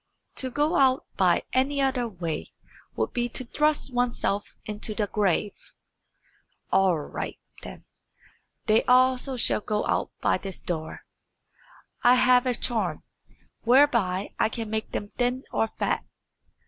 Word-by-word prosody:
"To 260 - +2
go 295 +6 +1
out 265 -1 +3
by 180 -3 +3
any 275 +2 +1
other 265 -3 +1
way 170 -7 -5 0.4
would - - -2
be 240 0 -1
to 255 - -4
thrust 300 0 0
oneself 240 -4 -1
into 210 0 -4
the 210 - 0
grave." 205 -1 0 1.2
"All 190 -3 +4
right, 150 - -5 0.2
then; - - -10 0.8
they 220 0 +4
also 255 +1 +3
shall 220 - +2
go 210 0 -1
out - - 0
by - - +1
this 195 -2 -7
door. 160 -2 -5 1.0
I 245 +1 +6
have 250 0 +4
a 250 - +1
charm, 230 0 -2 0.6
whereby 235 -7 +3
I - - +3
can 225 -2 -5
make 220 0 -3
them 205 - -4
thin 250 +2 0
or 225 - +1
fat." - - -2
240 Hz, 135 wpm, -26 LUFS, 205-255 Hz, 1.2 s, I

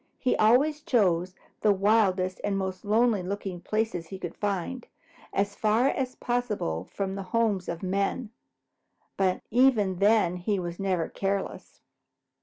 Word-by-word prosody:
He 255 - +1
always 280 +8 +4
chose 185 - +1 0.3
the 210 - +4
wildest 195 -2 +2
and 200 -1 0
most 190 -1 -3
lonely 220 0 +2
looking 190 -1 -5
places 215 -6 -2
he 190 - -7
could 175 -3 -6
find, 205 +5 -3 0.4
as 200 +1 0
far 220 +6 +2
as 255 -2 -2
possible 210 - -2
from 195 -1 -3
the 195 - -4
homes 200 -1 0
of 170 +2 -5
men, 200 +5 -1 0.8
but 185 -2 0
even 225 -6 +3
then 200 -4 +3
he 200 +3 -1
was 175 -2 -5
never 185 -4 0
careless. 195 0 -4
200 Hz, 140 wpm, -27 LUFS, 185-225 Hz, 0.8 s, always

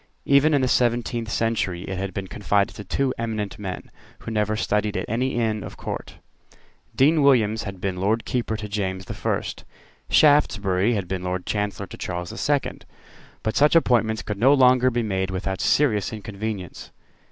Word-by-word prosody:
Even 140 +2 +4
in 140 - +2
the 130 - +2
seventeenth 120 -1 0
century 110 -6 -1
it 95 - -5
had 100 0 -3
been 95 +1 -4
confided 100 +2 0
to 105 - -7
two 130 +7 -1
eminent 110 -4 -3
men, 95 -3 -6 0.3
who - - -19
had 115 - -4
never 105 0 0
studied 105 -2 0
at 95 - -2
any 125 +4 -1
Inn 110 -3 0
of - - -9
Court. - - -6 0.8
Dean 150 +4 +4
Williams 110 -6 +3
had 100 -2 -6
been 95 -1 -2
Lord 110 +4 +1
Keeper 115 -3 -2
to 105 0 -6
James 95 -2 -3
the - - -6
First. - - -3 0.5
Shaftesbury 105 -8 +3
had 100 -4 -3
been 95 0 -3
Lord 90 0 -3
Chancellor 105 -1 -2
to - - -11
Charles 90 -1 -4
the - - -9
Second. 145 -2 -1 0.6
But 110 - -1
such 150 +3 +4
appointments 115 -8 +3
could 105 -1 -5
no 135 +5 +6
longer 130 -1 +5
be 120 -1 -1
made 95 -3 -1
without 95 +1 -3
serious 110 -9 +2
inconvenience. 105 -3 -6
110 Hz, 180 wpm, -23 LUFS, 95-120 Hz, 0.8 s, no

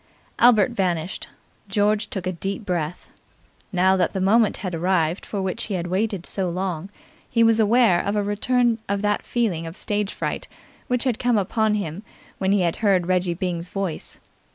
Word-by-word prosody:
Albert 240 0 +6
vanished. 180 -5 -2 0.4
George 210 +2 +1
took 190 -3 -5
a 185 - 0
deep 195 +4 -4
breath. 175 -3 -3 0.6
Now 190 0 +3
that 185 - +1
the 190 - -2
moment 210 +3 +3
had 180 - -3
arrived 170 0 0
for 200 -2 -3
which 190 +4 -2
he 205 - -3
had 175 -1 -2
waited 190 0 -1
so 190 -2 -2
long 180 0 -3 0.4
he 230 -1 +3
was 225 0 +4
aware 220 -4 +4
of 200 +1 -1
a 205 - +1
return 230 +3 +1
of 200 0 -1
that 210 0 +1
feeling 190 -9 -1
of 165 +4 -8
stage 205 -1 -1
fright - - -4 0.4
which 250 -1 0
had 250 -4 0
come 245 -2 +2
upon 210 +2 +1
him 185 -3 -4 0.4
when 190 0 +1
he 200 -2 +3
heard 185 0 +1
Reggie 180 -1 +1
Byng's 175 -1 -3
voice. 195 -5 -4
195 Hz, 175 wpm, -23 LUFS, 180-215 Hz, 0.6 s, Albert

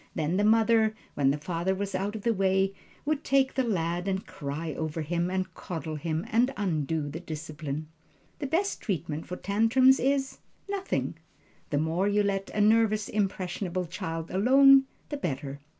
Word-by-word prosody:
Then 160 +3 0
the 205 - +2
mother, 220 0 +4 0.2
when 140 -2 +2
the 140 - +1
father 170 +4 -1
was 200 0 -3
out 195 +3 -2
of 210 - -6
the 235 - +2
way, 195 -1 +2 0.3
would 305 0 0
take 270 -1 +2
the 265 - +1
lad 175 -4 -1
and 190 0 -1
cry 150 +3 -5
over 160 +2 -3
him, 170 +3 -1
and 185 0 -2
coddle 160 -3 -5
him, 160 +2 -2
and 240 +4 +3
undo 160 -5 -1
the 150 +3 -5
discipline. 155 -2 -5 0.5
The 280 - -2
best 360 +8 0
treatment 165 -6 -3
for 180 - -4
tantrums 225 +8 +4
is 270 0 0 0.3
nothing. 395 -1 -2 0.5
The 145 - 0
more 165 +6 +1
you 205 0 +2
let 195 -1 -1
a 210 - -1
nervous, 215 0 +3
impressionable 185 -2 -2
child 165 -1 -5
alone, 270 +7 +6 0.2
the 290 - -3
better. 140 - -4
190 Hz, 165 wpm, -28 LUFS, 160-225 Hz, 0.5 s, alone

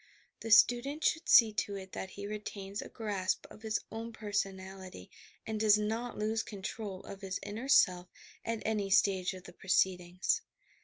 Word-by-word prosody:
The 225 - -6
student 245 +7 +5
should 320 - +1
see 225 -3 +8
to 200 +1 -2
it 190 -1 -8
that 190 - -5
he 200 +1 -8
retains 205 -1 -5
a - - -9
grasp 200 -4 -2
of - - -13
his 220 -1 -1
own 225 +1 -5
personality 190 - -4 0.3
and 220 -1 -3
does 210 -1 +6
not 225 +3 -2
lose 220 +1 0
control 200 -1 -6
of 195 0 -9
his 190 -1 -3
inner 215 +6 -5
self 180 -9 +4 0.4
at 230 -1 -3
any 210 -3 0
stage 190 -1 +3
of 185 - -11
the - - -12
proceedings. 180 -1 +1
205 Hz, 165 wpm, -32 LUFS, 190-220 Hz, 0.4 s, see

